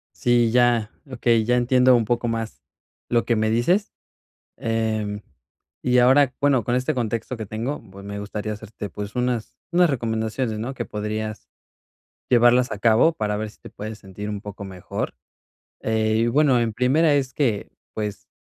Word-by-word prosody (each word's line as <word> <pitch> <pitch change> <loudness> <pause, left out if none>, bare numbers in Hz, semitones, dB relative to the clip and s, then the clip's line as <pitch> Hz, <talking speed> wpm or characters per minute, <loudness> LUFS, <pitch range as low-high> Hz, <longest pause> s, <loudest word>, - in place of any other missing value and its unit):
Sí, 120 -2 +3
ya, 120 -2 +3 0.2
okey, 115 -3 +2
ya 125 +2 +2
entiendo 125 +1 +4
un 115 -2 +2
poco 120 +2 0
más 115 -1 -3 0.5
lo 120 -1 +2
que 120 - +2
me 110 0 +1
dices. 150 - +1 0.7
Em, 110 -2 -2 0.6
y 125 0 +3
ahora, 130 +1 +5
bueno, 140 -5 +3
con 120 - 0
este 125 +1 0
contexto 115 0 -2
que 110 -2 -6
tengo, 115 +8 -4
pues 100 +1 -12
me 100 0 -6
gustaría 105 +1 -4
hacerte, 105 -1 -8
pues 105 0 -6
unas 125 -2 -1 0.2
unas 175 -1 +4
recomendaciones, 110 -2 -2
¿no? 120 +5 -4
Que - - -4
podrías 105 0 -4 0.8
llevarlas 125 +1 +5
a 105 - -4
cabo 115 +9 +4
para 105 -8 -2
ver 110 0 -4
si - - -23
te - - -11
puedes 110 +1 -7
sentir 100 +1 -8
un 105 -1 -4
poco 100 -1 -8
mejor. 95 -2 -5 0.7
Eh, 110 0 +1
y, 115 +1 +2
bueno, 135 0 +4
en 115 -2 0
primera 140 +7 +3
es 130 -2 -1
que, 115 -9 0 0.2
pues, 105 -2 -5
115 Hz, 170 wpm, -23 LUFS, 105-125 Hz, 0.8 s, ahora